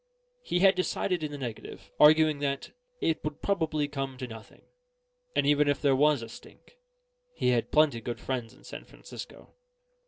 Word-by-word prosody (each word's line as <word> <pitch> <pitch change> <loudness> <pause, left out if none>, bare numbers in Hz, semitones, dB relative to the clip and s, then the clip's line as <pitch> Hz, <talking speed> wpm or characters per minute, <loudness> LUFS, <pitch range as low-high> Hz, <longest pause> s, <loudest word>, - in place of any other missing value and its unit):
He 175 - -1
had 195 0 +7
decided 185 -1 -1
in 155 -1 -3
the 145 - -6
negative, 120 -5 -8
arguing 155 0 +6
that 140 -1 -3 0.3
"it 160 - 0
would 150 -1 -5
probably 160 -6 0
come 135 -2 -5
to 125 - -5
nothing; 115 -2 -12 0.7
and - - +2
even 145 0 +3
if 145 -1 +1
there 140 -2 +3
was 145 -2 +3
a - - -7
stink, 485 - -15 0.6
he - - +1
had 120 -2 +1
plenty 150 -6 +3
good 120 +1 -5
friends 125 -4 -4
in - - -21
San - - -9
Francisco." - - -11
145 Hz, 175 wpm, -28 LUFS, 130-155 Hz, 0.7 s, had